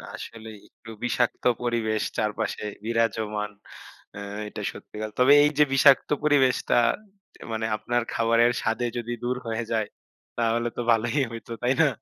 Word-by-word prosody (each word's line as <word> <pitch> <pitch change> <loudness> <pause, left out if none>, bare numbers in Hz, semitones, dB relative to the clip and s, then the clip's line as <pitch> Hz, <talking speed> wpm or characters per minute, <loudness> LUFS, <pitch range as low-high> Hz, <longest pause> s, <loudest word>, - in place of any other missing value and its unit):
আসলেই। 110 -2 -9
একটু 115 - -13
বিষাক্ত 120 0 0 0.2
পরিবেশ 110 -3 0 0.2
চারপাশে 105 0 -2 0.2
বিরাজমান। 110 -2 -1 0.6
অ্যা 100 - -8 0.3
এটা - - -7
সত্যিকার। 110 0 -7
তবে 130 +3 +7
এই 150 - +4
যে, - - +9
বিষাক্ত 135 0 +5
পরিবেশটা 140 -4 +3 0.6
দে - - -21
মানে, 110 0 -2
আপনার 120 +3 -1
খাবারের 115 +1 +3
স্বাদে 110 +2 -1
যদি 120 0 -4
দূর 125 +1 0
হয়ে 115 +1 -2
যায়, 110 -2 0 0.5
তাহলে 115 0 +1
তো - - -1
ভালোই 115 +5 +1
হইতো। 115 0 -9
তাই 125 +2 +3
না? 160 - +6
115 Hz, 145 wpm, -25 LUFS, 110-120 Hz, 0.6 s, যে